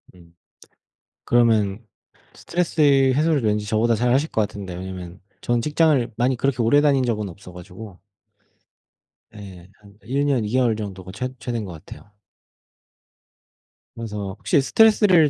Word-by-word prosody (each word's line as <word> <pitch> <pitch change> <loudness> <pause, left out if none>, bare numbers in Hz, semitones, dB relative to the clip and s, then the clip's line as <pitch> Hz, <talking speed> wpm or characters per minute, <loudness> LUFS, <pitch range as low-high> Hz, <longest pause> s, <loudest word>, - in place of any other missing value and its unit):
음. 85 -1 -20 0.9
그러면 110 -3 +2 0.5
스트레스 170 -2 -3 0.3
해소를 150 -1 +1
왠지 105 -1 0
저보다 115 +2 +1
잘하실 125 +7 +1
것 - - -1
같은데 100 -3 -6
왜냐하면 90 0 -8 0.2
전 120 -1 0
직장을 150 -4 +1
많이 125 +2 +1
그렇게 130 -1 0
오래 145 +6 +4
다닌 140 -3 +2
적은 105 -4 -2
없어 90 +1 -13
가지고. 90 +2 -12 1.4
예 95 -3 -12
한 100 -1 -19
1 135 +7 -1
년 140 -4 +1
2 105 - -4
개월 125 -2 +2
정도가 95 -3 -7
최 125 +5 -4
최대인 120 -3 -4
것 95 - -8
같아요. 80 +5 -13 1.9
그래서 105 -3 -6
혹시 140 - +1
스트레스를 200 -3 +4
115 Hz, 285 characters per minute, -22 LUFS, 100-135 Hz, 1.9 s, 오래